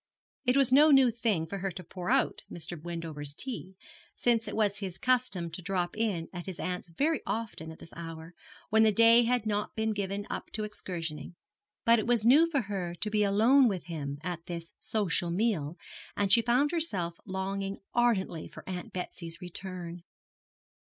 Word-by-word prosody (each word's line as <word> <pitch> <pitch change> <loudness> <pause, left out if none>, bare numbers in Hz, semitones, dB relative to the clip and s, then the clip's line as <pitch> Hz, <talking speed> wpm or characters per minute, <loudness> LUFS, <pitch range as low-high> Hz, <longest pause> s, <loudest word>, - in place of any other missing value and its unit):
It 250 +2 +3
was 265 -2 +5
no 300 +3 +8
new 270 -4 +6
thing 220 -8 0
for 195 +4 -5
her 195 +1 -1
to 180 - -7
pour 180 +1 -6
out - - +2
Mr. 170 -1 -5
Wendover's 160 -4 -5
tea, 215 - -5 0.4
since 230 -2 +2
it - - -4
was 205 -2 +1
his 190 -3 -5
custom 240 -10 +1
to 170 - -5
drop 180 -1 -1
in 210 -7 -1
at 175 0 -6
his 185 -2 -5
aunt's 180 -1 -3
very 295 - 0
often 220 -8 -4
at 160 - -11
this - - -13
hour, 165 0 -8 0.4
when 220 +1 +5
the 220 -1 +6
day 230 +2 +6
had 245 -1 +1
not 210 -1 -1
been 220 0 0
given 200 0 -3
up - - -5
to 215 - -2
excursionising; 170 -6 -5 0.5
but 230 0 +6
it 220 - -2
was 235 -3 +2
new 300 +8 +7
for 285 -5 +1
her 190 -5 -4
to 210 +5 -3
be 210 0 +2
alone 225 +7 +5
with 190 -5 -1
him 145 -5 -4
at 175 -2 -5
this 170 -1 -6
social 185 -5 -1
meal, 175 -5 0 0.4
and 200 -2 +1
she 230 - +7
found 250 +6 +2
herself 195 - -1
longing 195 0 -3 0.2
ardently 215 -9 +1
for - - -12
Aunt 180 -1 -5
Betsy's 170 -2 -6
return. 180 -1 -6
195 Hz, 185 wpm, -30 LUFS, 170-230 Hz, 0.5 s, no